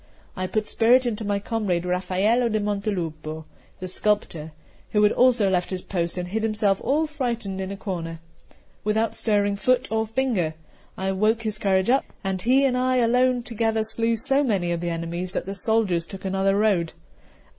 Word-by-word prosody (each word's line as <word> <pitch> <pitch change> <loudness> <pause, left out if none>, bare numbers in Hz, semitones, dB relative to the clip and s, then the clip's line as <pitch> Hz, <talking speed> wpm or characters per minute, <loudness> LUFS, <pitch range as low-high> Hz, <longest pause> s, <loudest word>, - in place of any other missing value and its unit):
I 185 -1 -2
put 215 +3 -1
spirit 245 +4 +4
into 225 -2 -2
my 205 -1 0
comrade 200 -4 -1
Raffaello 190 +6 +1
da 215 - 0
Montelupo, 175 -7 -3 0.3
the 185 - -6
sculptor, 180 -5 -1 0.4
who 210 -1 +4
had 210 - +5
also 245 -5 +4
left 180 -2 0
his 185 -1 -4
post 170 -2 -2
and 180 0 -3
hid 220 +4 -1
himself 215 -3 +1
all 305 +4 +2
frightened 235 -10 -3
in 190 +1 -4
a 200 - -6
corner, 165 -5 -5 0.6
without 220 +2 +1
stirring 205 -2 +1
foot 255 +4 +2
or 220 0 0
finger; 220 -10 0 0.4
I 190 0 -1
woke 215 +4 +1
his 215 -1 -2
courage 195 +1 +2
up, 270 - +2 0.2
and 190 -1 -2
he 260 +5 +4
and 255 -2 +2
I 255 0 +1
alone 250 +1 +3
together 225 -1 0
slew 230 +1 0
so 270 +4 +2
many 195 -9 0
of 170 -1 -2
the 175 - -2
enemies 170 +2 -4
that - - -2
the 195 - -4
soldiers 200 -4 0
took 195 -1 -9
another 195 +1 +1
road. 195 -6 +1
205 Hz, 180 wpm, -24 LUFS, 185-230 Hz, 0.6 s, had